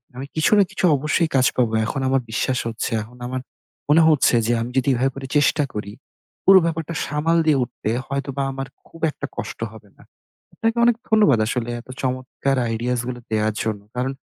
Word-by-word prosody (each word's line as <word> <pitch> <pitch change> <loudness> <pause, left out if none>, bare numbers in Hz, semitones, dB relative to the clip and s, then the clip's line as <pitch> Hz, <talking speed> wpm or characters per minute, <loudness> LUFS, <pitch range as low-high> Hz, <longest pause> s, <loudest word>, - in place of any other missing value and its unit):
আমি 135 +2 -6
কিছু 155 - +2
না 205 - +7
কিছু - - -1
অবশ্যই 155 +4 +1
কাজ 130 -1 +4
পাবো, 120 -3 +2
এখন 135 +5 -3
আমার 135 0 +2
বিশ্বাস 125 +3 0
হচ্ছে 115 +2 -3
এখন 120 +3 -15
আমার, 130 +1 -3 0.5
মনে 155 +3 +6
হচ্ছে 150 -5 +4
যে 120 - +2
আমি 120 - -4
যদি 130 +1 +2
এভাবে 130 +2 +1
করে 135 -1 -6
চেষ্টা 145 +1 +3
করি, 105 -1 -5 0.5
পুরো 190 0 +9
ব্যাপারটা 165 0 -2
সামাল 150 +3 +1
দিয়ে 155 -3 +4
উঠতে 115 - -5 0.2
হয়তোবা 140 0 -3
আমার 135 0 -5 0.2
খুব 165 - -15
একটা - - -6
কষ্ট - - -5
হবে 110 -2 -14
না। - - -17 0.5
আপনাকে 225 +1 -1
অনেক 240 -1 +4
ধন্যবাদ 210 - +5
আসলে 120 0 -2
এত 120 - -15
চমৎকার 130 +1 -1
আইডিয়াস 120 +2 -1
গুলো 125 -1 -4
দেয়ার 110 0 +1
জন্য। 110 -2 -2
কারণ 130 +2 -1
130 Hz, 190 wpm, -22 LUFS, 120-150 Hz, 0.5 s, পুরো